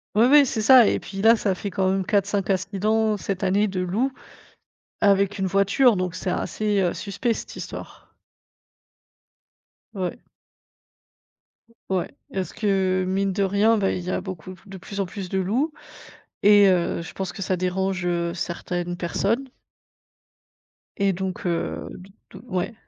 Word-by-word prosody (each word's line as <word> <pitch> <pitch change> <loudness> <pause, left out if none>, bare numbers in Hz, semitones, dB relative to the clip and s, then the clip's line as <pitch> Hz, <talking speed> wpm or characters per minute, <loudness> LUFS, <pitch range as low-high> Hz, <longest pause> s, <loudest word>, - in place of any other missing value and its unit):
Oui, 220 +3 +5
oui, 290 +1 +8
c'est 220 - -2
ça, 245 0 +8
et - - +1
puis 195 -1 -7
là, 225 +2 +7
ça 205 -3 0
fait 200 +2 -5
quand 190 0 0
même 190 0 0
4-5 200 -1 0
incidents 210 +3 +1
cette 195 -1 -4
année, 200 +3 +2
de 190 -2 -3
loups, 210 +10 0 0.9
avec 200 0 +3
une 190 - -1
voiture. 200 +6 +3
Donc 180 -2 -2
c'est 185 0 -3
assez, 210 +1 -1
heu, 175 -2 +1
suspect, 215 +4 -2
cette - - -8
histoire. - - -9 1.8
Ouais. 185 -4 -4 1.7
Ou 190 - +1
ouais. 175 - -3 0.2
Est-ce 190 -1 -3
que 190 -3 +1
mine 195 +1 0
de 200 +1 0
rien, 205 +4 +3
ben, 195 -2 +1
il 180 - -3
y 180 - -3
a - - -1
beaucoup 185 -1 -7
p 180 - -23
de 195 -1 -9
plus 200 +2 -8
en - - 0
plus 190 +1 -7
de 190 - 0
loups 245 - 0 0.7
et 205 0 +7
heu, 175 -2 +1
je 165 - -9
pense 190 -2 -4
que 195 - -8
ça 185 0 0
dérange, 185 0 -1
heu, 170 -1 -1
certaines 175 0 -4
personnes. 220 +9 -1 1.5
Et 200 -1 +2
donc, 190 0 -4
heu, 170 -1 -2
d 185 +2 -12 0.2
d 190 - -11
ouais. 185 +1 -2
195 Hz, 165 wpm, -24 LUFS, 185-205 Hz, 1.8 s, oui